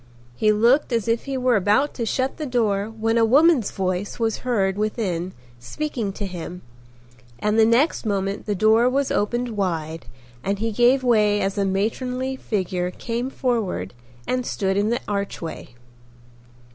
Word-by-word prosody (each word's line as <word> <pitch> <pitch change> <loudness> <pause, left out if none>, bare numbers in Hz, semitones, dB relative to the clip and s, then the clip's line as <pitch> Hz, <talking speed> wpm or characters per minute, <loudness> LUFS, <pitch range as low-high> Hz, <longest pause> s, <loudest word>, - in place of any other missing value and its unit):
He 215 - +3
looked 235 +7 +3
as 230 -2 0
if 230 0 0
he 275 -1 -3
were 255 -1 +2
about 210 +8 +2
to 230 -3 -3
shut 260 +4 -1
the 305 - -4
door 215 -5 +1
when 225 +1 0
a - - +4
woman's 275 +1 +4
voice 185 +1 -2
was 225 -2 -1
heard 200 -7 0
within 200 -4 -2 0.3
speaking 225 - -3
to 205 - -4
him 180 -1 -7 0.7
and 210 - +1
the 220 - +6
next 250 +8 +2
moment 200 -1 -2
the 205 - 0
door 220 +5 +4
was 275 +1 0
opened 240 +4 0
wide 165 -7 -3 0.4
and 200 +1 -1
he 225 +2 -1
gave 245 +4 +3
way 210 -4 +3
as 195 0 -1
a 200 -1 0
matronly 250 +7 -1
figure 185 -7 -2
came 235 +7 -4
forward 220 - -2 0.3
and 255 0 -1
stood 195 -5 -1
in 205 +2 +1
the 235 - 0
archway. 200 -10 -4
220 Hz, 160 wpm, -23 LUFS, 195-245 Hz, 0.7 s, the